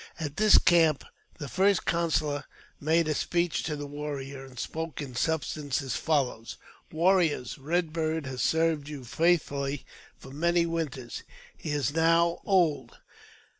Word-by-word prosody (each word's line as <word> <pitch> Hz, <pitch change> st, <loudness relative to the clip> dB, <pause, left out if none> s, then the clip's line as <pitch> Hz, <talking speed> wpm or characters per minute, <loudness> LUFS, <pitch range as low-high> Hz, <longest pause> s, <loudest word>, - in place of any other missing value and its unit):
At 150 Hz, -3 st, -5 dB
this 215 Hz, 0 st, +7 dB
camp 165 Hz, -4 st, +4 dB, 0.3 s
the 145 Hz, -, -6 dB
First 195 Hz, +6 st, +2 dB
Counsellor 155 Hz, -4 st, 0 dB, 0.3 s
made 160 Hz, +2 st, +2 dB
a 155 Hz, -, +1 dB
speech 170 Hz, +2 st, 0 dB
to 150 Hz, -, -2 dB
the 145 Hz, 0 st, -5 dB
warriors, 140 Hz, -2 st, -6 dB
and 125 Hz, -, -16 dB
spoke 160 Hz, +3 st, -5 dB
in 140 Hz, -4 st, -6 dB
substance 145 Hz, +1 st, -1 dB
as 135 Hz, -, -3 dB
follows: 135 Hz, -7 st, -1 dB, 0.2 s
'* -, -, -30 dB
Warriors! 165 Hz, -6 st, +2 dB
Eed 175 Hz, -3 st, +1 dB
Bird 160 Hz, -2 st, -1 dB
has 130 Hz, -1 st, -4 dB
served 160 Hz, -3 st, +1 dB
you 145 Hz, -3 st, -7 dB
faithfully 145 Hz, -1 st, 0 dB, 0.4 s
many 170 Hz, +5 st, +1 dB
winters. 150 Hz, -8 st, -4 dB, 0.3 s
He -, -, -7 dB
is 145 Hz, -1 st, 0 dB
now 165 Hz, +1 st, +3 dB
old. 160 Hz, -10 st, +1 dB
155 Hz, 140 wpm, -28 LUFS, 140-165 Hz, 0.4 s, this